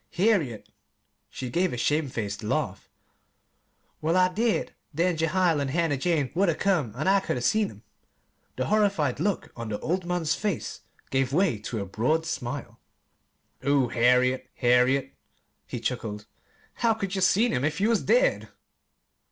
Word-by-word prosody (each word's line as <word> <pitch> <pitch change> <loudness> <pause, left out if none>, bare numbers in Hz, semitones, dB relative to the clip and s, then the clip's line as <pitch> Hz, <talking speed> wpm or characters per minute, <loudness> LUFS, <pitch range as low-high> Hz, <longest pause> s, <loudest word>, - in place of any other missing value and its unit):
"Harriet!" 175 - +1 0.6
She 125 -2 -6
gave 180 +5 +1
a 125 - -4
shamed 145 +3 0
faced 100 -3 -4
laugh. 105 - -2 1.1
"Well, 165 +3 +1
I 185 0 +3
did 225 +3 0 0.2
then 170 +3 +1
Jehiel 165 0 +2
and 140 -1 -1
Hannah 165 0 +1
Jane 145 -1 0
would 190 +2 +2
'a' 165 - +1
come, 155 - 0
an' 155 +8 -2
I 195 +1 +5
could 190 - -2
'a' - - -3
seen 210 - +2
'em." - - -15 0.7
The - - -1
horrified 200 - +1
look 200 +3 -1
on 115 -2 -6
the 105 - -2
old 180 +3 -1
man's 175 -3 0
face 200 -1 -3 0.3
gave 135 0 +1
way 170 - +2
to 110 0 -4
a - - -3
broad 130 +12 0
smile. 125 -5 -5 0.8
"Oh, 135 -2 +2
Harriet 125 +2 +2
Harriet!" 125 +2 +3 0.5
he - - -5
chuckled, 105 -1 -4 0.5
"how 230 -2 +2
could 195 -3 -4
ye 190 - -1
seen 215 +6 +3
'em 125 - 0
if 150 +1 -1
you 210 +3 +2
was 230 -3 +2
dead?" - - +2
155 Hz, 160 wpm, -26 LUFS, 125-185 Hz, 1.1 s, I